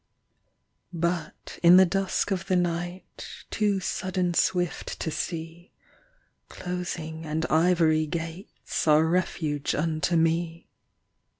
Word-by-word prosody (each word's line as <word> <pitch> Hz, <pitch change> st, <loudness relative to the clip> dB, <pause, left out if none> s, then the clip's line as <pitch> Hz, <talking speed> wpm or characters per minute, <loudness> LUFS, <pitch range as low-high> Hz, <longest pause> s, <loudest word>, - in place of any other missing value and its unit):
But 170 Hz, -1 st, -3 dB
in 175 Hz, +1 st, +8 dB
the 190 Hz, -, +8 dB
dusk 195 Hz, +2 st, -1 dB
of 190 Hz, 0 st, -2 dB
the 185 Hz, -, +2 dB
night, 175 Hz, +1 st, -4 dB
Too 205 Hz, -2 st, +1 dB
sudden 185 Hz, -1 st, -1 dB
swift 175 Hz, 0 st, 0 dB
to 160 Hz, -, -2 dB
see, 165 Hz, +2 st, -5 dB, 0.8 s
Closing 175 Hz, -3 st, -5 dB
and 155 Hz, +1 st, -2 dB
ivory 160 Hz, -1 st, +3 dB
gates 165 Hz, +3 st, -5 dB
Are 155 Hz, +1 st, +5 dB
refuge 160 Hz, -4 st, -1 dB
unto 155 Hz, +1 st, 0 dB
me. 165 Hz, +1 st, 0 dB
170 Hz, 105 wpm, -26 LUFS, 160-180 Hz, 0.8 s, in